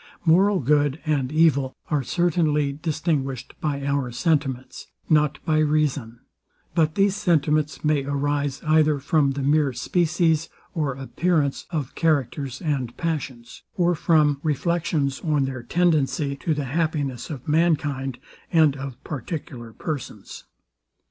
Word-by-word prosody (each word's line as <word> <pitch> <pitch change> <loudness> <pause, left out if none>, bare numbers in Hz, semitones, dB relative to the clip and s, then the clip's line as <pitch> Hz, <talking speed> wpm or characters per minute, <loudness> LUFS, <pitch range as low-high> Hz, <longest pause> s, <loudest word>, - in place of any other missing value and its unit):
Moral 190 +4 +4
good 145 +2 +2
and 145 -4 0
evil 150 -4 +3 0.2
are 150 -2 +2
certainly 155 -1 +1
distinguished 145 -4 -2
by 140 -2 -2
our 140 -3 -1
sentiments, 135 -2 -1 0.2
not 150 -1 +3
by 155 -1 +2
reason: 145 -6 0 0.5
But 160 -1 +2
these 195 -1 +3
sentiments 155 -6 +1
may 150 -2 +2
arise 145 0 -1
either 155 -1 +4
from 140 0 +1
the 140 0 -3
mere 145 -1 +2
species 165 +3 +1 0.2
or 145 -5 -1
appearance 145 +2 -1
of 150 -6 -3
characters 140 -4 -1
and 135 -6 -2
passions, 135 -8 -4 0.2
or 175 -1 +3
from 150 -3 +3
reflections 155 -2 0
on 150 -4 +1
their 130 -2 -5
tendency 150 -1 +1
to 155 +2 -1
the 145 -1 -2
happiness 145 -3 -2
of 135 -5 -7
mankind, 145 -5 +1 0.3
and 155 -4 +4
of 135 -1 -8
particular 130 -4 -6
persons. 145 +2 -6
150 Hz, 125 wpm, -24 LUFS, 135-160 Hz, 0.5 s, Moral